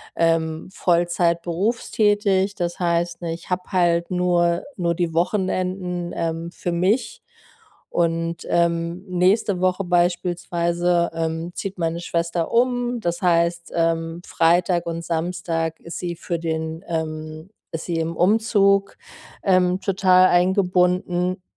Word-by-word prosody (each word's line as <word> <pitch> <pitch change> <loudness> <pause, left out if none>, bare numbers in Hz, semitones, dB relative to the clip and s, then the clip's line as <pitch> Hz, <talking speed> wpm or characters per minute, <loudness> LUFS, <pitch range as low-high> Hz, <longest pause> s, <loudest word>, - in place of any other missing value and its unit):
ähm, 165 0 0
Vollzeit 170 -1 +1
berufstätig. 205 +1 +1
Das 175 -2 -3
heißt, 170 0 0
ich 165 +1 -5
habe 180 0 -1
halt 170 -2 +2
nur 175 -1 +2
nur 170 -1 +1
die 170 -1 -1
Wochenenden, 180 -1 -1
ähm, 165 0 -3
für 175 - -4
mich. 205 +7 0 0.7
Und, 165 0 -1
ähm, 170 +2 0
nächste 185 +2 +2
Woche 185 +1 +1
beispielsweise, 175 0 +1
ähm, 165 +1 -3
zieht 195 -1 -5
meine 165 0 -1
Schwester 170 -1 -1
um. 245 0 +1
Das 170 -3 -2
heißt, 170 -1 +1
ähm, 165 0 0
Freitag 175 +1 +2
und 165 0 -4
Samstag 165 -1 -2
ist 170 - -7
sie 175 -1 -3
für 170 0 -4
den, 160 +1 -3
ähm 155 +1 -5 0.2
ist 165 - -5
sie 170 -2 -2
im 165 0 -3
Umzug, 200 0 +3 0.5
ähm, 185 -1 +3
total 185 -2 +4
eingebunden 180 0 +1
175 Hz, 120 wpm, -22 LUFS, 170-185 Hz, 0.7 s, total